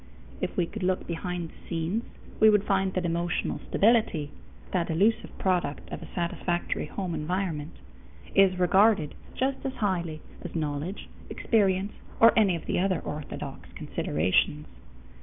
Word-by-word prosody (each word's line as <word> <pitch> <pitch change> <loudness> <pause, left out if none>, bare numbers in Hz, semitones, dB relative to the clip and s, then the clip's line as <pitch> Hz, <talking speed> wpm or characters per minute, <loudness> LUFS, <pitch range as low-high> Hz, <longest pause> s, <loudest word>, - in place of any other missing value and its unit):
If - - -3
we 175 - +3
could 215 +5 -8
look 185 0 0
behind 175 0 -3
the - - -19
scenes, 170 +7 -1 0.3
we 220 - +8
would 210 -2 +4
find 195 -2 +1
that 185 -1 0
emotional 170 +1 -1
stability 205 -9 +3 0.4
that 175 -3 0
elusive 200 +8 +1
product 175 -6 0
of - - -5
a - - -8
satisfactory 175 0 -1
home 185 -4 -4
environment 160 -1 -2 0.6
is 195 -2 +5
regarded 190 -2 +4 0.2
just 265 +1 -1
as 270 -1 -2
highly 170 -7 -1 0.2
as - - -7
knowledge, 155 +4 -3 0.2
experience, 200 -2 +1 0.3
or 230 - +8
any 200 -5 +4
of 165 - -6
the - - 0
other 185 -1 +1
orthodox 150 -1 -6
considerations. 95 - 0
180 Hz, 140 wpm, -28 LUFS, 165-200 Hz, 0.6 s, we